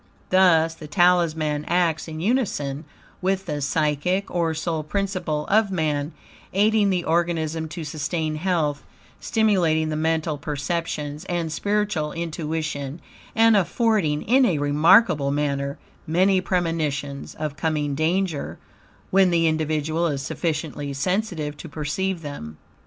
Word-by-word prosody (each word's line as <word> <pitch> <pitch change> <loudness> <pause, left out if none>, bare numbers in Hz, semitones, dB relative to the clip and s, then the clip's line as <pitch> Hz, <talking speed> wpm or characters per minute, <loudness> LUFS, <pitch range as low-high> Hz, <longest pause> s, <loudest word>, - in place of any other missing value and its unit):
Thus, 165 -4 +5
the 160 -1 -10
Talisman 160 -2 +2
acts 170 -2 +1
in 155 -1 -6
unison 170 - -1 0.4
with 190 +1 0
the 150 -4 -3
psychic, 155 +6 0
or 165 -2 0
soul 160 0 -2
principle, 175 -3 -2
of 215 0 +3
man, 155 -4 -1 0.4
aiding 210 +1 +3
the 180 -2 0
organism 160 -1 0
to 160 +1 -6
sustain 155 +1 -2
health, 155 -4 0 0.4
stimulating 175 -8 +2
the 155 - -2
mental 160 -1 0
perceptions, 150 0 -3
and 170 -3 -2
spiritual 200 -4 -1
intuition, 155 -3 -3 0.4
and 225 0 +5
affording 195 -5 +1
in 260 +4 +4
a 180 -11 +2
remarkable 150 +2 +4
manner, 140 -1 -1 0.3
many 185 +4 +3
premonitions 155 -6 -2
of 150 -2 -4
coming 150 -3 -1
danger, 160 +1 -1 0.5
when 190 -1 +5
the 170 -1 +2
individual 155 +1 0
is 140 -3 -2
sufficiently 150 -1 -3
sensitive 160 0 -1
to 165 - -9
perceive 165 +4 -2
them. 80 - -7
160 Hz, 125 wpm, -23 LUFS, 150-180 Hz, 0.5 s, Thus